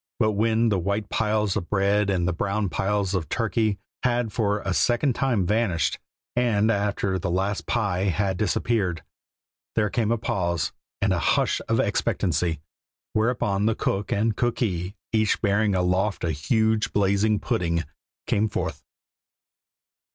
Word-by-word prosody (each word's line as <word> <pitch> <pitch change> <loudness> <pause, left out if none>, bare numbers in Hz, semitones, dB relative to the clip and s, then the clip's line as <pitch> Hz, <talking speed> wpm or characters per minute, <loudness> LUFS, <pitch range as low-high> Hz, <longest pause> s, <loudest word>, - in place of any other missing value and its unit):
But 110 -3 +2
when 110 +2 +2
the 100 -3 +1
white 100 +4 -2
piles 105 -2 +1
of 85 - -3
bread 100 0 +2
and 90 -3 +1
the 90 - +1
brown 100 +3 -1
piles 95 +2 0
of 90 -5 -2
turkey 110 -2 0 0.2
had 120 -3 0
for 105 -3 0
a 95 - -2
second 120 +7 +2
time 120 -8 +1
vanished, 100 -4 +1 0.4
and 115 -3 +2
after 100 -2 0
the 95 - -2
last 95 +3 -1
pie 100 -5 0
had 95 +1 0
disappeared, 100 -3 0 0.7
there 105 -3 +1
came 115 -2 0
a 115 - +2
pause 85 -7 -1 0.3
and - - +3
a - - 0
hush - - +1
of - - +2
expectancy, 80 -4 0 0.5
whereupon 110 -3 +1
the 110 - +2
cook 100 +1 -2
and 110 +1 +1
cookee, 100 -6 -1 0.2
each 110 -1 +2
bearing 100 -1 +2
aloft 90 +2 0
a 85 - +1
huge, 110 - +1
blazing 100 +2 +2
pudding, 85 -4 -1 0.4
came 105 +2 +1
forth. - - -3
100 Hz, 145 wpm, -25 LUFS, 95-110 Hz, 0.7 s, and